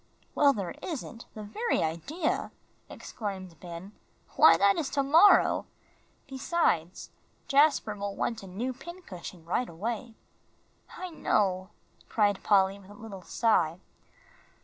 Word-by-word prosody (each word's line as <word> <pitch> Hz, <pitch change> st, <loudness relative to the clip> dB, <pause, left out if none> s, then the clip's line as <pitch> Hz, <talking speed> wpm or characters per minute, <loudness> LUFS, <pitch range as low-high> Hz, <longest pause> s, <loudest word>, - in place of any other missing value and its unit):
"Well, 285 Hz, -1 st, +5 dB
there 195 Hz, -9 st, -4 dB
isn't. 250 Hz, -7 st, -6 dB
The 215 Hz, -, -7 dB
very 440 Hz, -, -1 dB
idea!" 280 Hz, -, -2 dB, 0.4 s
exclaimed 190 Hz, -6 st, -7 dB
Ben; 175 Hz, +2 st, -9 dB, 0.4 s
"why, 165 Hz, 0 st, +7 dB
that 200 Hz, +2 st, +4 dB
is 295 Hz, -4 st, -2 dB
to 275 Hz, 0 st, 0 dB
morrow. 330 Hz, +9 st, +5 dB, 0.6 s
Besides, 260 Hz, -, -1 dB, 0.4 s
Jasper 285 Hz, -7 st, +3 dB
will 200 Hz, -1 st, -4 dB
want 230 Hz, -, -2 dB
a 195 Hz, -, -10 dB
new 230 Hz, +8 st, -3 dB
pincushion 205 Hz, -, -10 dB
right 235 Hz, +8 st, -1 dB
away." 225 Hz, +6 st, -5 dB, 0.8 s
"I 365 Hz, -1 st, -6 dB
know," 190 Hz, -, 0 dB, 0.4 s
cried 205 Hz, -3 st, +2 dB
Polly, 195 Hz, -1 st, +3 dB
with 195 Hz, -1 st, -17 dB
a 205 Hz, -, -12 dB
little 205 Hz, -3 st, -9 dB
sigh. 175 Hz, -5 st, +1 dB
205 Hz, 125 wpm, -29 LUFS, 185-275 Hz, 0.8 s, why